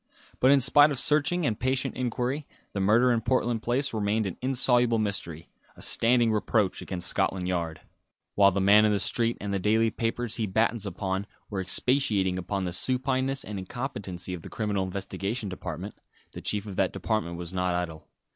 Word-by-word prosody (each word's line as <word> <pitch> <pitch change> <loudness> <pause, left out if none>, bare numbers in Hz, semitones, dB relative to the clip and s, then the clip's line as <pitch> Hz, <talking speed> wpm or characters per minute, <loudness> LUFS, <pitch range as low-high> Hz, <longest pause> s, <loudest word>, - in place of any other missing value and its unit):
But 130 - +4
in 140 0 +5
spite 145 +4 +6
of 140 - -2
searching 150 +5 +2
and 110 -6 -1
patient 130 +1 -1
inquiry, 125 +3 -2 0.3
the 100 - -3
murder 110 +6 +4
in 115 -1 +1
Portland 120 -1 0
Place 130 +4 -1
remained 110 0 0
an 95 - -4
insoluble 125 -2 +3
mystery, 100 -7 -2 0.3
a - - -14
standing 120 0 +3
reproach 105 -2 0
against 90 -1 -2
Scotland 95 -2 +1
Yard. 85 -3 -3 0.5
While 100 -1 +5
the 100 - -1
man 100 +2 +6
in 105 - +3
the 105 - +2
street 115 +3 +2
and 100 -1 -4
the 100 - 0
daily 110 +3 +2
papers 115 +1 -1
he 110 -2 -1
battens 110 +1 0
upon 95 +1 -3 0.2
were 95 -2 -2
expatiating 95 -2 +1
upon 95 +2 -3
the 90 -1 -3
supineness 130 +5 0
and 105 -2 -6
incompetency 95 -4 -6
of 90 - -6
the - - -10
Criminal 105 -4 -2
Investigation 100 +3 -4
Department, 90 +1 -6 0.4
the - - -9
chief 105 -1 0
of 100 -3 -8
that 95 -2 +1
department 95 -3 -2
was 85 0 -6
not 90 -1 0
idle. 80 -3 -5
105 Hz, 185 wpm, -27 LUFS, 95-120 Hz, 0.5 s, spite